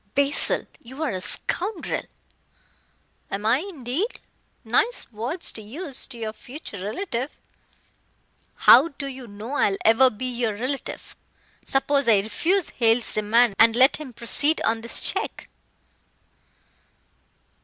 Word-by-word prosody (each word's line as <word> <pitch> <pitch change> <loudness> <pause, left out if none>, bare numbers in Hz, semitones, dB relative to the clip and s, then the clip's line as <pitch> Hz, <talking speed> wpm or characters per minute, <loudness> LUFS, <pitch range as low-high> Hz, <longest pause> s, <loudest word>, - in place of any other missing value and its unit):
"Basil, 280 +1 +4 0.2
you 260 +6 -7
are 300 - -1
a 185 -2 -4
scoundrel!" 370 - -2 1.3
"Am 200 +2 -4
I, 230 +4 +3
indeed? 330 - -4 0.4
Nice 255 - +1
words 240 - -1
to 220 - -5
use 270 - -4
to 250 - -10
your 220 -1 -5
future 245 - -9
relative." 245 - -3 1.3
"How 260 +7 +7
do 280 -3 -8
you 260 -2 -8
know 210 +5 -8
I 290 - +2
will 195 - -3
ever 230 +4 +6
be 235 +2 -7
your 240 -4 -2
relative. 255 +6 -5 0.5
Suppose 275 0 +1
I 220 -3 +6
refuse 330 - 0
Hale's 230 -1 +2
demand, 220 +2 +3
and 225 0 +6
let 260 +3 +4
him 300 -4 -9
proceed 285 +6 0
on 225 0 0
this 235 - 0
check?" - - -2
250 Hz, 130 wpm, -23 LUFS, 225-285 Hz, 1.3 s, How